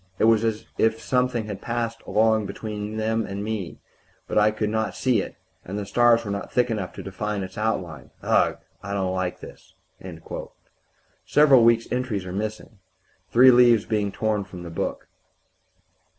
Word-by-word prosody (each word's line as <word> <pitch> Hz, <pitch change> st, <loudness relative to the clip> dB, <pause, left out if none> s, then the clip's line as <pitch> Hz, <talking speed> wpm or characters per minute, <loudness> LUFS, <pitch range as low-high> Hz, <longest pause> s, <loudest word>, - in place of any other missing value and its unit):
It -, -, 0 dB
was 110 Hz, 0 st, +5 dB
as 110 Hz, -1 st, -1 dB
if 110 Hz, 0 st, +2 dB
something 125 Hz, -2 st, 0 dB
had 105 Hz, -2 st, -6 dB
passed 115 Hz, -1 st, -3 dB
along 110 Hz, -1 st, +2 dB
between 105 Hz, 0 st, -5 dB
me 110 Hz, -, -2 dB
and 110 Hz, +1 st, 0 dB
them; 100 Hz, -1 st, -4 dB, 0.5 s
but -, -, -4 dB
I 105 Hz, 0 st, +5 dB
could 105 Hz, 0 st, -2 dB
not 110 Hz, 0 st, -1 dB
see 125 Hz, -6 st, +2 dB
it, -, -, -8 dB, 0.3 s
and 95 Hz, +3 st, -6 dB
the 105 Hz, -, -3 dB
stars 120 Hz, +1 st, +3 dB
were 100 Hz, -, -3 dB
not 100 Hz, 0 st, -5 dB
thick 125 Hz, -1 st, +2 dB
enough 100 Hz, -5 st, -3 dB
to -, -, -8 dB
define 100 Hz, +1 st, -3 dB
its 95 Hz, 0 st, -8 dB
outline. 90 Hz, -, -3 dB
Ugh! -, -, +2 dB, 0.2 s
I 100 Hz, -, -5 dB
don't 95 Hz, -2 st, -1 dB
like 95 Hz, -1 st, -3 dB
this... -, -, -13 dB, 0.7 s
." -, -, -32 dB, 0.7 s
Several 140 Hz, -5 st, +5 dB
weeks' 115 Hz, 0 st, +4 dB
entries 125 Hz, -7 st, -2 dB
are 90 Hz, -, -6 dB
missing, 110 Hz, +1 st, -5 dB, 0.5 s
three 130 Hz, +2 st, +7 dB
leaves 120 Hz, -3 st, +5 dB
being 105 Hz, -3 st, -1 dB
torn 105 Hz, 0 st, -1 dB
from 90 Hz, -2 st, -10 dB
the 85 Hz, -, -8 dB
book. 80 Hz, -, -4 dB
110 Hz, 175 wpm, -24 LUFS, 100-115 Hz, 0.7 s, three